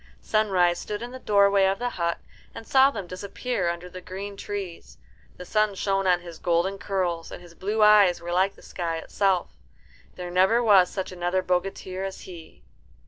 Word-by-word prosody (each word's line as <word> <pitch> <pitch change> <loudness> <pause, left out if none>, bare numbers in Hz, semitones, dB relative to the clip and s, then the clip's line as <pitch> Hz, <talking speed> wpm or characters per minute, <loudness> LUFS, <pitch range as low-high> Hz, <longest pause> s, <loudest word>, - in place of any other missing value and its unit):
Sunrise 185 -5 +1
stood 210 +2 -5
in 240 - -7
the 260 - -8
doorway 200 -3 +4
of 195 +1 +1
the 245 +2 -2
hut, 170 -1 -1 0.4
and 225 - -8
saw 270 0 +6
them 205 -8 -6
disappear 190 +2 -3
under 170 +1 -5
the 185 0 -10
green 195 +3 -7
trees. 185 - -7 0.4
The 180 - -9
sun 215 +1 +1
shone 195 0 0
on 180 -1 +3
his 170 -2 -10
golden 175 +3 0
curls, 180 -4 -2
and - - -8
his 175 -1 -15
blue 210 +5 0
eyes 205 -4 +6
were 170 +1 -6
like 190 +2 +2
the - - -18
sky 170 -2 -4
itself. 190 +2 0 0.6
There, 180 -1 -6
never 190 +7 +3
was 195 -5 +6
such 190 -2 -5
another 180 +1 -1
bogatir 185 +1 -2
as 195 0 -6
he. 170 -3 -12
190 Hz, 185 wpm, -25 LUFS, 175-200 Hz, 0.6 s, saw